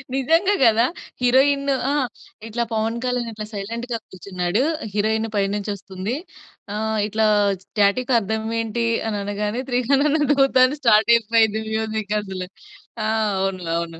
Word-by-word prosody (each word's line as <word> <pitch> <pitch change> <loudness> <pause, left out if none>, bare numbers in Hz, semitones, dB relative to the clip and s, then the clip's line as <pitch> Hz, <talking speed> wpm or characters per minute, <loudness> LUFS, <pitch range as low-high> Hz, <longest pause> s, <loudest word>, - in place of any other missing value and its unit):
నిజంగా 330 +9 +2
గదా! 230 0 +5 0.4
హీరోయిన్ 275 +3 +3 0.2
ఆ! - - +1 0.6
ఇట్లా 235 +2 -2
పవన్ 225 +1 -1
కళ్యాణ్ 250 -2 -1
అట్లా 215 -1 -6
సైలెంట్‌గా 230 +4 -4
కూర్చున్నాడు. 185 +4 -2 0.3
హీరోయిన్ 220 +2 0
పైనుంచి 200 +1 -1
ఒస్తుంది. 195 +3 -5 0.6
ఆహ్, 220 0 -1
ఇట్లా 220 +1 +1 0.4
స్టాటిక్ 215 +5 +1
అర్థం 220 +1 -3
ఏంటి 230 +1 -1 0.2
అని 210 -2 -2
అనగానే 210 +3 -2
'త్రిగణన 275 +5 +2
దూత' 270 -2 +3
అని 280 +4 -2
స్టార్ట్ 220 -2 +5
అయిపోయింది 220 -1 +2
మ్యూజిక్ 220 -1 -2
అసలు. 190 -2 -6 0.6
ఆ! - - 0 0.3
అవును. 190 -2 -2
అవును. 165 -1 -5
220 Hz, 130 wpm, -22 LUFS, 205-245 Hz, 0.6 s, గదా